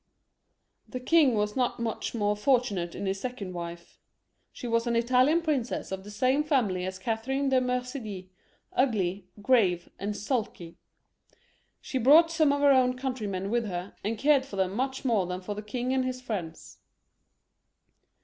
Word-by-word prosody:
The 255 Hz, -, -5 dB
king 275 Hz, -1 st, +4 dB
was 210 Hz, 0 st, -1 dB
not 250 Hz, -2 st, 0 dB
much 230 Hz, 0 st, -3 dB
more 210 Hz, -2 st, +1 dB
fortunate 210 Hz, -7 st, +1 dB
in -, -, -4 dB
his 195 Hz, 0 st, -1 dB
second 215 Hz, -6 st, -5 dB
wife. 170 Hz, 0 st, -8 dB, 0.5 s
She 245 Hz, -, -7 dB
was 230 Hz, +1 st, +1 dB
an 235 Hz, -, +1 dB
Italian 255 Hz, +8 st, +3 dB
princess 275 Hz, -11 st, -2 dB
of 190 Hz, 0 st, -4 dB
the 205 Hz, -, -10 dB
same 255 Hz, +7 st, +1 dB
family 215 Hz, -, 0 dB
as 190 Hz, 0 st, -5 dB
Cathe 225 Hz, +4 st, -3 dB
rine 270 Hz, +1 st, 0 dB
de 260 Hz, -1 st, +3 dB
Medicis, 250 Hz, -6 st, -3 dB, 0.5 s
ugly, 200 Hz, -7 st, 0 dB, 0.2 s
grave, 195 Hz, -8 st, +3 dB
and 205 Hz, +1 st, -3 dB
sulky. 210 Hz, -7 st, -3 dB, 1.0 s
She 260 Hz, -, -3 dB
brought 310 Hz, +7 st, +6 dB
some 315 Hz, -3 st, +3 dB
of 285 Hz, 0 st, 0 dB
her 285 Hz, -1 st, +6 dB
own 255 Hz, -1 st, +3 dB
countrymen 210 Hz, -7 st, -3 dB
with 235 Hz, -1 st, +1 dB
her, 180 Hz, 0 st, -5 dB
and 220 Hz, +3 st, -2 dB
cared 280 Hz, +2 st, +4 dB
for 265 Hz, -7 st, -9 dB
them 190 Hz, -1 st, 0 dB
much 265 Hz, +3 st, -2 dB
more 215 Hz, -8 st, +2 dB
than 180 Hz, 0 st, -3 dB
for 190 Hz, +3 st, -5 dB
the 210 Hz, -, -6 dB
king 245 Hz, +4 st, -3 dB
and 260 Hz, -1 st, +1 dB
his 255 Hz, 0 st, -3 dB
friends. 190 Hz, -10 st, -6 dB
235 Hz, 170 wpm, -28 LUFS, 195-260 Hz, 1.0 s, brought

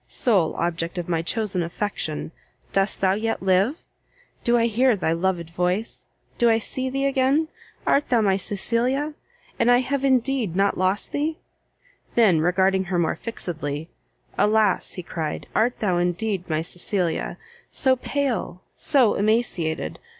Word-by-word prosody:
sole 195 Hz, -10 st, +2 dB
object 170 Hz, 0 st, -2 dB
of 175 Hz, -, -3 dB
my 165 Hz, -2 st, 0 dB
chosen 195 Hz, 0 st, -1 dB
affection! 170 Hz, -3 st, -3 dB, 0.4 s
dost 195 Hz, +1 st, +2 dB
thou 190 Hz, -1 st, +3 dB
yet 220 Hz, 0 st, -2 dB
live? 195 Hz, -, +2 dB, 0.6 s
do 240 Hz, 0 st, +3 dB
I 230 Hz, -, +3 dB
hear 240 Hz, +2 st, +3 dB
thy 180 Hz, -5 st, -1 dB
loved 170 Hz, -1 st, -1 dB
voice? 180 Hz, +6 st, -2 dB, 0.3 s
do 235 Hz, -, +5 dB
I 225 Hz, -, +4 dB
see 260 Hz, +3 st, -3 dB
thee 275 Hz, +1 st, -1 dB
again? 275 Hz, +3 st, +2 dB, 0.4 s
art 285 Hz, -, +2 dB
thou 245 Hz, -2 st, +4 dB
my 200 Hz, -3 st, +3 dB
Cecilia? 245 Hz, +9 st, -1 dB, 0.5 s
and 235 Hz, -, +3 dB
have 255 Hz, +3 st, +2 dB
I -, -, +3 dB
indeed 255 Hz, -7 st, +1 dB
not 195 Hz, +1 st, +2 dB
lost 185 Hz, +2 st, +1 dB
thee?" 310 Hz, +2 st, -1 dB, 0.8 s
then 205 Hz, -9 st, +5 dB
regarding 190 Hz, +2 st, +2 dB
her 180 Hz, 0 st, -1 dB
more 170 Hz, -2 st, +1 dB
fixedly, 160 Hz, -8 st, -5 dB, 0.5 s
"Alas," 210 Hz, -2 st, +2 dB
he 180 Hz, -, -6 dB
cried, 160 Hz, -2 st, -4 dB
"art 240 Hz, +3 st, +2 dB
thou 185 Hz, -5 st, +1 dB
indeed 180 Hz, +1 st, -1 dB
my 155 Hz, 0 st, 0 dB
Cecilia! 175 Hz, 0 st, -2 dB, 0.3 s
so 260 Hz, -2 st, +2 dB
pale, 255 Hz, -9 st, -2 dB
so 260 Hz, -8 st, +3 dB
emaciated! 195 Hz, -, 0 dB
205 Hz, 145 wpm, -24 LUFS, 175-245 Hz, 0.8 s, do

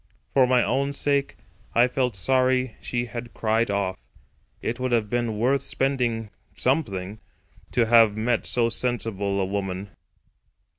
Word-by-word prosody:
For 130 Hz, -2 st, +5 dB
my 125 Hz, -1 st, +4 dB
own 140 Hz, +1 st, 0 dB
sake 140 Hz, 0 st, 0 dB, 0.4 s
I 120 Hz, +1 st, +6 dB
felt 125 Hz, -3 st, -1 dB
sorry 130 Hz, +3 st, +1 dB
she 120 Hz, -1 st, -2 dB
had 120 Hz, 0 st, -8 dB
cried 110 Hz, +1 st, +1 dB
off; 100 Hz, -2 st, -1 dB, 0.6 s
it 120 Hz, +2 st, -3 dB
would 130 Hz, 0 st, -1 dB
have 110 Hz, -3 st, +1 dB
been 120 Hz, -3 st, -1 dB
worth 130 Hz, +5 st, +2 dB
something 120 Hz, -6 st, -1 dB, 1.4 s
to 120 Hz, -, +3 dB
have 115 Hz, -2 st, +5 dB
met 115 Hz, +1 st, 0 dB
so 120 Hz, -1 st, +2 dB
sensible 110 Hz, -5 st, -1 dB
a 95 Hz, -, +1 dB
woman. 95 Hz, 0 st, -4 dB
120 Hz, 135 wpm, -25 LUFS, 110-125 Hz, 1.4 s, I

